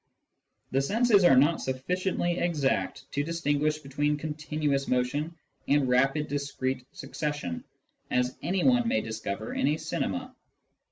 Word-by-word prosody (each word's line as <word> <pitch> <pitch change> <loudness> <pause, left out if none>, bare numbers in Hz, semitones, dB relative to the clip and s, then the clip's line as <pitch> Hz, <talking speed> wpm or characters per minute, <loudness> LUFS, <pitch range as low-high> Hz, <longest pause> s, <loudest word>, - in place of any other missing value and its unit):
The 135 - +2
senses 210 - +4
are 155 - +7
not 145 +5 +4
sufficiently 175 +6 -1
exact 150 -6 0
to 145 - 0
distinguish 150 -2 0
between 145 +1 -1
continuous 150 -2 -2
motion 145 +6 0 0.3
and 140 -2 +3
rapid 135 +4 +2
discrete 135 -3 -3
succession, 145 - -4 0.5
as 125 0 +1
anyone 235 +7 +2
may 255 - +2
discover 110 -1 -4
in - - +1
a 150 +2 +2
cinema. 255 +11 -3
145 Hz, 120 wpm, -28 LUFS, 135-170 Hz, 0.5 s, are